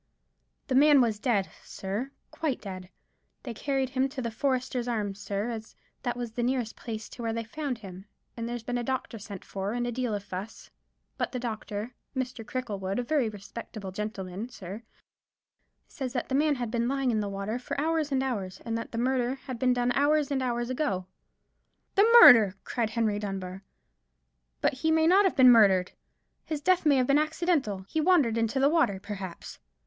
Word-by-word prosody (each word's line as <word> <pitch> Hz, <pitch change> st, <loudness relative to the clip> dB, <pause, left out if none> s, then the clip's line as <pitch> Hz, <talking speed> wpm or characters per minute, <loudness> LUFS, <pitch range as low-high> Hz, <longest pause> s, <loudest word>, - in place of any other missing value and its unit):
"The 270 Hz, -, -2 dB
man 290 Hz, +2 st, +7 dB
was 225 Hz, -4 st, +2 dB
dead, 210 Hz, -6 st, +1 dB, 0.2 s
sir; 205 Hz, +7 st, -4 dB, 0.2 s
quite 300 Hz, -6 st, -2 dB
dead. 185 Hz, -2 st, -8 dB, 0.5 s
They 245 Hz, -, -5 dB
carried 270 Hz, +2 st, -1 dB
him 265 Hz, +1 st, +1 dB
to 270 Hz, 0 st, -7 dB
the 235 Hz, -2 st, -2 dB
Foresters' 255 Hz, 0 st, -1 dB
Arms, 205 Hz, -4 st, -2 dB
sir, 205 Hz, +3 st, -3 dB
as 220 Hz, -1 st, -7 dB, 0.3 s
that 245 Hz, -2 st, -2 dB
was 240 Hz, -2 st, -4 dB
the 240 Hz, -, -3 dB
nearest 245 Hz, -2 st, -1 dB
place 220 Hz, -2 st, -6 dB
to -, -, -10 dB
where 225 Hz, -1 st, -1 dB
they 230 Hz, 0 st, -2 dB
found 265 Hz, +2 st, -4 dB
him; 190 Hz, -3 st, -10 dB, 0.3 s
and 230 Hz, 0 st, -4 dB
there's 240 Hz, -1 st, -4 dB
been 245 Hz, +1 st, -2 dB
a -, -, -3 dB
doctor 255 Hz, -2 st, -3 dB
sent 200 Hz, -2 st, -9 dB
for, 195 Hz, +2 st, -3 dB
and 240 Hz, 0 st, -1 dB
a 240 Hz, -, -2 dB
deal 240 Hz, -2 st, -1 dB
of 200 Hz, -, -5 dB
fuss: 195 Hz, +2 st, -8 dB, 0.5 s
but -, -, -1 dB
the -, -, -1 dB
doctor—Mr. 240 Hz, +2 st, -5 dB
Cricklewood, 205 Hz, -5 st, -3 dB
a 245 Hz, -, 0 dB
very 260 Hz, -3 st, +1 dB
respectable 205 Hz, -1 st, -8 dB
gentleman, 205 Hz, +1 st, -5 dB
sir—says 225 Hz, +5 st, -11 dB
that 245 Hz, -, -2 dB
the -, -, -3 dB
man 295 Hz, +2 st, +3 dB
had 240 Hz, -4 st, -4 dB
been 235 Hz, 0 st, 0 dB
lying 270 Hz, -1 st, +1 dB
in 220 Hz, -, +1 dB
the 205 Hz, -1 st, -2 dB
water 200 Hz, +4 st, -3 dB, 0.2 s
hours 310 Hz, 0 st, 0 dB
and 265 Hz, -1 st, +1 dB
hours, 200 Hz, -8 st, -3 dB
and 230 Hz, -1 st, -2 dB
that 230 Hz, -, -4 dB
the -, -, -3 dB
murder 250 Hz, +1 st, +1 dB
had 260 Hz, -3 st, -8 dB
been 255 Hz, 0 st, +3 dB
done 245 Hz, 0 st, +1 dB
hours 290 Hz, +2 st, +2 dB
and 270 Hz, -1 st, +1 dB
hours 240 Hz, -1 st, -1 dB
ago." 200 Hz, -9 st, -1 dB, 0.9 s
"The 415 Hz, +3 st, +5 dB
murder!" 210 Hz, -6 st, +9 dB
cried 230 Hz, -3 st, -1 dB
Henry 220 Hz, -2 st, 0 dB
Dunbar; 195 Hz, -2 st, -5 dB, 1.0 s
"but -, -, +2 dB
he 280 Hz, +5 st, -1 dB
may 320 Hz, 0 st, +4 dB
not 380 Hz, +4 st, +6 dB
have 380 Hz, -, +2 dB
been 255 Hz, -2 st, +8 dB
murdered! 195 Hz, -6 st, +5 dB, 0.5 s
His 310 Hz, -2 st, -3 dB
death 350 Hz, +1 st, +2 dB
may 285 Hz, -, +6 dB
have 255 Hz, -1 st, +3 dB
been 280 Hz, +3 st, +4 dB
accidental. 305 Hz, -, 0 dB
He 315 Hz, -, -1 dB
wandered 305 Hz, -10 st, +4 dB
into 225 Hz, +4 st, 0 dB
the 270 Hz, -, +5 dB
water, 290 Hz, -, +2 dB
perhaps." 195 Hz, -3 st, -7 dB
240 Hz, 190 wpm, -28 LUFS, 210-265 Hz, 1.0 s, murder